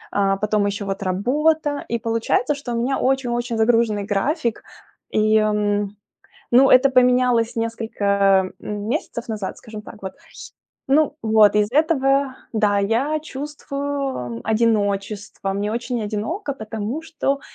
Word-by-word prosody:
э, 195 -1 +2
потом 210 -1 +1
еще 200 0 -3
вот 195 0 -4
работа. 290 - 0
И 235 - 0
получается, 230 +5 0
что 270 -4 -6
у - - -1
меня 265 +3 0
очень-очень 245 -3 0
загруженный 225 -2 +2
график. 230 - -1 0.5
И, 215 0 +3 1.1
ну, 260 +3 +6
это 255 +2 +6
поменялось 250 -3 +3
несколько, 200 -4 +1
э, - - -17
месяцев 225 +3 -4
назад, 210 -4 -4
скажем 215 -2 -9
так 210 0 -12
вот. 190 -1 -6 0.7
Ну 290 +2 +2
вот, 215 -2 +5
из 210 +2 +1
этого, 275 -3 +2 0.2
да, 210 -3 +2
я 235 +10 +1
чувствую 280 - -4
одиночество. 210 -2 0
Мне 205 +2 -2
очень 240 0 -3
одиноко, 225 - -3
потому 220 +5 -5
что, 290 -3 -2
230 Hz, 125 wpm, -21 LUFS, 210-270 Hz, 1.1 s, ну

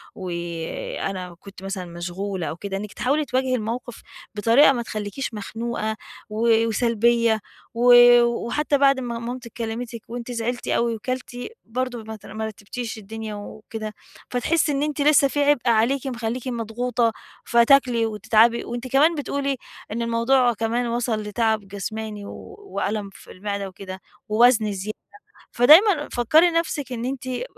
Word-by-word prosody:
وأنا 175 +1 -5
كنت 195 -1 -13
مثلًا 195 -1 -4
مشغولة 175 +2 -4
أو - - -4
كده، 195 +2 -5
إنك 205 +1 -7
تحاولي 290 +4 0
تواجهي 255 -1 0
الموقف 235 +1 -5 0.3
بطريقة 230 +8 +5
ما 245 -3 -1
تخليكيش 215 +3 -5
مخنوقة 220 +1 -3 0.3
و 225 +1 +3
وسلبية 230 0 +2 0.3
و 245 +1 +5 0.3
وحتى 240 +5 0
بعد 275 -1 +4
ما 240 -2 -4
مامتِك 240 0 -6
كلمتِك 230 0 -4
وأنتِ 240 +1 -6
زعلتِ 240 +1 -3
أوي 235 -1 +1
وكلتِ، 250 +2 -5 0.3
برضه 245 0 -3
ما 220 0 -7
ت 215 - -15
ما 220 0 -5
رتبتيش 220 +2 -6
الدنيا 220 +1 -7
وكده، 215 +1 -7 0.4
فتحسي 300 +6 +1
إن 280 0 0
أنتِ 300 -1 -2
لسه 290 -1 +5
فيه 290 +2 -1
عبئ 285 -4 +3
عليكِ 240 +5 +2
مخلّيكِ 240 0 -3
مضغوطة 235 0 -1 0.3
فتاكلي 235 -1 +4
وتتعبي 225 +2 +3
وأنتِ 240 +2 -5
كمان 295 +6 +4
بتقولي 280 -2 -2 0.3
إن 230 +2 -2
الموضوع 235 +2 +3
كمان 230 +2 -1
وصل 230 -2 -1
لتعب 215 -1 0
جسماني 210 +1 -5
و - - -10
وألم 215 - -3
في - - -14
المعدة 200 +1 -4
وكده 190 0 -9 0.3
ووزن 220 -1 +4
زيادة. 200 +2 -5 0.5
فدايمًا 305 - +6
فكّري 310 +9 +4
نفسِك 315 -5 -1
إن 240 -1 -3
أنتِ 260 0 -4
ب 255 - -2
235 Hz, 145 wpm, -23 LUFS, 215-255 Hz, 0.5 s, فدايمًا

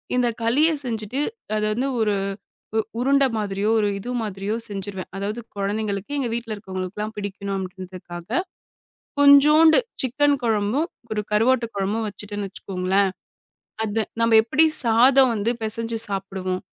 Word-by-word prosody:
இந்தக் 240 -1 0
களிய 260 +8 +3 0.2
செஞ்சுட்டு 225 +1 -3 0.4
அது 215 - 0
வந்து 255 +5 -1
ஒரு 210 -2 +2 0.6
உ - - +4 0.2
உருண்ட 275 +2 +3
மாதிரியோ 205 0 -1
ஒரு 210 - +2
இது 245 +5 -6
மாதிரியோ 205 0 -3
செஞ்சிருவேன். 195 -2 -6
அதாவது 210 +4 -3 0.2
குழந்தைங்களுக்கு 205 +4 -2
எங்க 250 -4 -1
வீட்டுல 230 -2 -3
இருக்கவங்களுக்குல்லாம் 200 +2 -5
பிடிக்கணும், 200 -1 -4
அப்டின்றதுக்காகக் 185 - -5 0.7
கொஞ்சோண்டு 300 +3 +7 0.2
சிக்கன் 285 +3 +2
குழம்பும், 225 +8 +1 0.2
ஒரு 210 -1 0
கருவாட்டு 235 +3 +3
குழம்பும் 205 +3 -1
வச்சிட்டன்னு, 205 0 -5
வெச்சுக்கோங்களன், 190 0 0 0.8
அத 220 +1 -1 0.2
நாம 230 -1 +5
எப்டி 285 +8 +3 0.2
சாதம் 250 +3 +5
வந்து 220 +3 0
பெசஞ்சு 225 +1 -1
சாப்டுவோம். 190 -2 -3
215 Hz, 125 wpm, -23 LUFS, 200-240 Hz, 0.8 s, கொஞ்சோண்டு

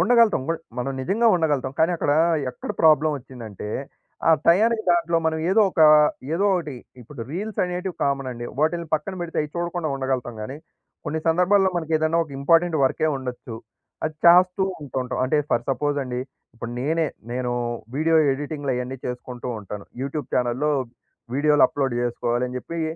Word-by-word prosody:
ఉండగలుగుతాం. 225 - +4
బుడ్ 165 0 -1 0.2
మనం 135 +2 -2
నిజంగా 220 - +1
ఉండగలుగుతాం. 145 -6 0
కానీ, 165 +2 +4
అక్కడ 145 - +1 0.4
ఎక్కడ 125 - -7
ప్రాబ్లమొచ్చిందంటే, 135 - +1 0.6
ఆ - - +7 0.2
టయానికి 220 +6 +4
దాంట్లో 170 -1 +2
మనం 160 0 0
ఏదో 220 +3 +4
ఒక 165 - -2 0.5
ఏదో 195 +4 +1
ఒకటి 155 -7 -3 0.3
ఇప్పుడు 125 +1 -11
రీల్సనేటివి 180 -1 -3
కామనండి. 130 -4 -2
వాటిల్ని 165 +1 0
పక్కన 155 +5 -3
పెడితే 170 -1 -5
అయి 150 - -6
చూడకుండా 170 -2 -2
ఉండగలుగుతాం‌గాని, 130 -2 -3 0.5
కొన్ని 160 +1 -2
సందర్భాల్లో 190 +3 +3
మనకేదన్నా 160 0 +1
ఒక 150 - -17
ఇంపార్టెంట్ 165 +3 +3
వర్కె 155 +4 +1
ఉండొచ్చు. 125 -2 -7 0.5
అది 155 0 -2
చాస్తూ 180 +2 +6 0.2
ఉంటూంటాం. 130 -2 -4
అంటే 130 - +1
ఫర్ 120 - +1
సపోజండి, 135 -3 -1 0.3
ఇప్పుడు 115 0 -7
నేనే, 160 +3 +1 0.3
నేను 125 0 -2 0.5
వీడియో 160 +2 +3 0.2
ఎడిటింగులు 145 0 -3
అయన్నీ 125 +1 -4
చేసుకుంటూ 125 0 -6
ఉంటాను. 105 0 -8 0.2
యూట్యూబ్ 140 +2 -4
చానెల్‌లో 125 +4 +1 0.6
వీడియోలు 150 +1 +3
అప్‌లోడ్ 135 -3 -2
జేసుకోవాలని 120 +1 -1
జెప్పి, 165 +6 -6
150 Hz, 140 wpm, -23 LUFS, 130-170 Hz, 0.6 s, ఆ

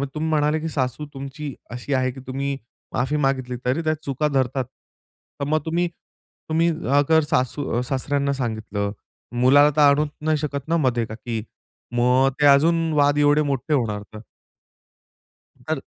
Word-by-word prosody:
तुम्ही 155 +1 -1
म्हणाले 150 0 +2
की 160 - -4
सासू 135 0 -2
तुमची 140 +1 -6 0.2
अशी 125 +4 -4
आहे 130 -1 +1
की 130 - -11
तुम्ही 140 +1 -2 0.4
माफी 130 +4 0
मागितली 130 -2 -1
तरी 130 +6 +1
त्या 155 0 +2
चुका 140 +1 -1
धरतात. 135 -2 0 0.7
तर 140 - -1
मग 155 +1 +2
तुम्ही 170 +2 0 0.6
तुम्ही 165 +2 +3 0.3
अगर 160 +3 +4
सासू 130 +3 0
अ, - - +1
सासऱ्यांना 140 +2 -1
सांगितलं 110 -5 -3 0.5
मुलाला 145 +3 +6
तर 155 - +3
आणू 145 +1 +5 0.2
नाही 155 0 +1
शकत 145 -1 -4
ना 165 +1 +2
मधे, 125 -6 +1
का 110 - -8
की 115 -1 -4 0.5
मग 125 +2 +4
ते - - +5
अजून 165 +4 +4
वाद 145 -1 +3
एवढे 145 +1 +4
मोठे 140 +1 -1
होणार 110 -6 0
तर. 110 - -8 1.5
तर. - - -1
140 Hz, 160 wpm, -23 LUFS, 125-150 Hz, 1.5 s, मुलाला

